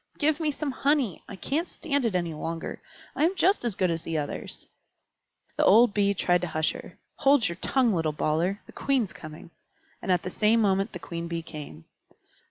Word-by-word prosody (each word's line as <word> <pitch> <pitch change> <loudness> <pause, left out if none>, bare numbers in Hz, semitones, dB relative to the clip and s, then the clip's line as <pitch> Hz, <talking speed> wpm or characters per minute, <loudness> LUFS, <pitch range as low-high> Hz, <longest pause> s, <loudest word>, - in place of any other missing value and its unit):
"Give 305 +1 +2
me 315 -2 0
some 290 0 -3
honey! 270 - +1
I - - -7
can't 310 - -2
stand 285 -5 -1
it 215 -5 0
any 170 -2 -1
longer. 165 +2 -5 0.3
I - - +1
am 350 +4 +3
just 385 -2 +3
as 235 -5 -1
good 185 -3 +1
as 165 -1 -2
the 165 -1 -3
others." 145 -1 -5 0.9
The - - +3
old 225 +2 +6
Bee 200 -1 +2
tried 175 -1 +2
to 180 - -2
hush 155 -1 0
her. - - -10 0.2
"Hold 275 -4 +4
your 170 0 -5
tongue, 250 +1 +2
little 160 -3 0
bawler! 165 +6 0
The - - -14
Queen's 260 -8 0
coming." 155 +1 -11 0.5
And - - -1
at 180 -1 +2
the 180 - -4
same 220 +4 +3
moment 195 -1 +1
the - - -4
Queen 170 -1 -6
Bee 170 -1 -4
came. 145 - -9
195 Hz, 200 wpm, -27 LUFS, 165-265 Hz, 0.9 s, old